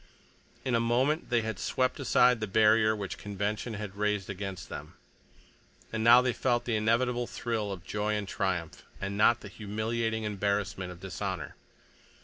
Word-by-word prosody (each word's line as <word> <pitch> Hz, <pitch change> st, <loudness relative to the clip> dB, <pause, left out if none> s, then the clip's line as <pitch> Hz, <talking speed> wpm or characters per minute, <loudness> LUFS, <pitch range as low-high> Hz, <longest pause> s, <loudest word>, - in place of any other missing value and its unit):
In 130 Hz, -, 0 dB
a 115 Hz, -, +4 dB
moment 130 Hz, +7 st, +1 dB
they 120 Hz, -2 st, +2 dB
had 110 Hz, -3 st, -4 dB
swept 130 Hz, +1 st, 0 dB
aside 125 Hz, -2 st, +4 dB
the 110 Hz, -, -2 dB
barrier 110 Hz, +1 st, +4 dB
which 100 Hz, -3 st, -5 dB
convention 105 Hz, +3 st, -3 dB
had 100 Hz, -1 st, -6 dB
raised 105 Hz, -2 st, -1 dB
against 95 Hz, -4 st, -6 dB
them, -, -, -8 dB, 1.0 s
and 110 Hz, 0 st, -1 dB
now 120 Hz, +2 st, +8 dB
they 125 Hz, -1 st, +1 dB
felt 120 Hz, -1 st, 0 dB
the 115 Hz, -, 0 dB
inevitable 120 Hz, +3 st, +1 dB
thrill 110 Hz, -4 st, -2 dB
of 95 Hz, -2 st, -7 dB
joy 105 Hz, +1 st, -1 dB
and 105 Hz, -2 st, -3 dB
triumph, 90 Hz, -5 st, -2 dB, 0.2 s
and 100 Hz, 0 st, -3 dB
not 115 Hz, +3 st, +4 dB
the -, -, -8 dB
humiliating 110 Hz, +2 st, -2 dB
embarrassment 100 Hz, -2 st, -1 dB
of 90 Hz, 0 st, -12 dB
dishonor. 95 Hz, -5 st, -4 dB
105 Hz, 160 wpm, -30 LUFS, 100-115 Hz, 1.0 s, now